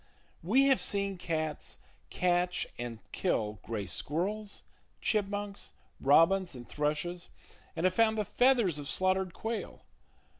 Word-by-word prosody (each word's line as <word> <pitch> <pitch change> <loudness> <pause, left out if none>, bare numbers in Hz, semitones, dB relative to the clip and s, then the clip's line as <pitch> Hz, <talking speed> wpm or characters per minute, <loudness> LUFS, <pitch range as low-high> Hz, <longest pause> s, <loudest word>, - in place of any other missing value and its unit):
We 230 +11 +4
have 270 -1 +4
seen 200 -2 0
cats 155 -3 -3 0.3
catch 180 0 +1
and 120 -1 -4
kill 105 -1 -1
gray 110 -3 -4
squirrels, 195 - -3 0.4
chipmunks, 205 -1 -2 0.3
robins 165 +4 +4
and 120 -1 -9
thrushes, 150 +4 -2 0.5
and 165 - -3
have 185 0 +3
found 220 +1 +3
the 210 - 0
feathers 235 - +3
of 145 - -6
slaughtered 185 +1 +1
quail. 225 +1 -5
180 Hz, 120 wpm, -31 LUFS, 150-205 Hz, 0.5 s, We